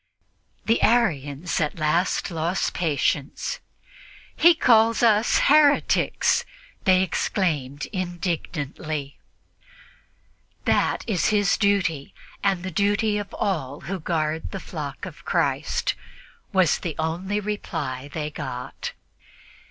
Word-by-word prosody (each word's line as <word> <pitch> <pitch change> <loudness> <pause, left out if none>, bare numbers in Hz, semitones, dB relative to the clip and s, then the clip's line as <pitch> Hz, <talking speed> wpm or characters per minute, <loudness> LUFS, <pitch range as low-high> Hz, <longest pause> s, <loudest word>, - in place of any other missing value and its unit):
The 225 - +2
Arians 165 - +1
at 150 +1 -1
last 165 +5 +1
lost 165 +3 -1
patience. 145 -4 -1 0.8
"He 340 0 +6
calls 230 -4 +4
us 220 -1 +4
heretics!" 290 0 +4 0.4
they 185 -1 +5
exclaimed 150 - -1
indignantly. 160 -5 -4 1.5
"That - - +2
is 185 -9 +1
his 205 -3 +3
duty 185 -8 0 0.3
and 195 -3 +1
the 185 - -4
duty 205 +3 +1
of 205 - -6
all 145 -8 -2
those - - -9
who 195 -1 -2
guard 160 -1 -2
the - - -5
flock - - -6
of - - -10
Christ" - - 0 0.6
was 185 -6 +3
the 165 -4 -4
only 175 +6 -1
reply 145 -10 -4
they 150 -1 -4
got. 125 -4 -6
175 Hz, 105 wpm, -24 LUFS, 150-205 Hz, 1.5 s, He